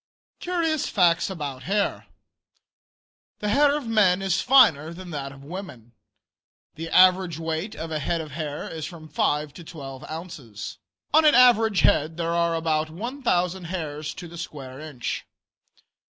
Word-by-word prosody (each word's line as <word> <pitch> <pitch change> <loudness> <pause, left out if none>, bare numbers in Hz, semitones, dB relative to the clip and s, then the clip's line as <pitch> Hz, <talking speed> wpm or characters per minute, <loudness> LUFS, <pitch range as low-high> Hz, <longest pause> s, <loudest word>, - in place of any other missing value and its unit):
CURIOUS 330 -4 0
FACTS 175 -2 +3
ABOUT 145 -8 -5
HAIR. 200 +7 -1 1.3
The 210 - -3
hair 285 +6 +4
of 295 - -6
men 200 -5 +3
is 190 -3 +1
finer 165 - +5
than 180 0 -9
that 140 -3 -4
of 140 -1 -13
women. 140 - -9 0.8
The 165 +1 -6
average 185 -2 +5
weight 165 +5 -3
of 160 0 -6
a 155 - -1
head 165 +3 -1
of 155 -2 -6
hair 150 0 -5
is 160 -2 -5
from 160 -3 -11
5 150 -1 0
to 175 - -11
12 135 -5 -9
ounces. 140 - -8 0.3
On 315 +1 +6
an 305 -4 +6
average 225 -5 +5
head 155 +2 +2
there 170 0 -1
are 170 -1 +1
about 160 -1 0
1,000 190 - -1
hairs 155 -4 -5
to 175 - -8
the 170 0 -10
square 135 -5 -8
inch. 150 -6 -5
165 Hz, 150 wpm, -25 LUFS, 150-190 Hz, 1.3 s, On